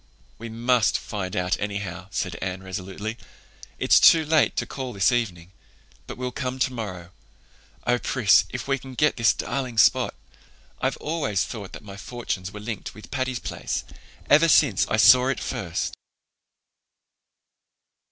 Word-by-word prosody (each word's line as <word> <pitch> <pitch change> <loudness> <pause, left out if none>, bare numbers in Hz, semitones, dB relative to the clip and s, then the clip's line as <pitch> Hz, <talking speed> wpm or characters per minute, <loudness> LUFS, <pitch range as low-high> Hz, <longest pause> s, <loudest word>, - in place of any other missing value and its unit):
"We 115 +1 -7
must 120 0 +2
find 95 -2 -5
out 90 -1 0
anyhow," 100 -3 -4
said 90 -3 -3
Anne 95 0 -4
resolutely. 95 +4 -5 0.6
"It's - - +5
too 160 -1 +7
late 155 0 +3
to - - -1
call 130 -2 -6
this 100 +1 +3
evening, 90 -8 -2 0.6
but - - -7
we'll 125 0 -3
come 130 0 -4
tomorrow. 105 -9 -3 0.7
Oh, 120 0 +2
Pris, 115 -6 +4
if 125 0 -6
we 135 -1 +1
can 130 0 -11
get 150 +4 +2
this 115 -2 +4
darling 130 -4 -4
spot! 110 - +4 0.7
I've - - 0
always 150 - -1
felt 100 -5 -7
that - - -9
my 100 -2 -10
fortunes 100 -5 -5
were 105 - -8
linked 105 -1 -6
with 105 - -13
Patty's 130 -2 -1
Place, - - -4 0.4
ever 155 +3 +6
since 140 - +4
I 110 - 0
saw 125 +4 +7
it 135 - -1
first." 85 -4 -3
115 Hz, 150 wpm, -24 LUFS, 95-130 Hz, 0.7 s, too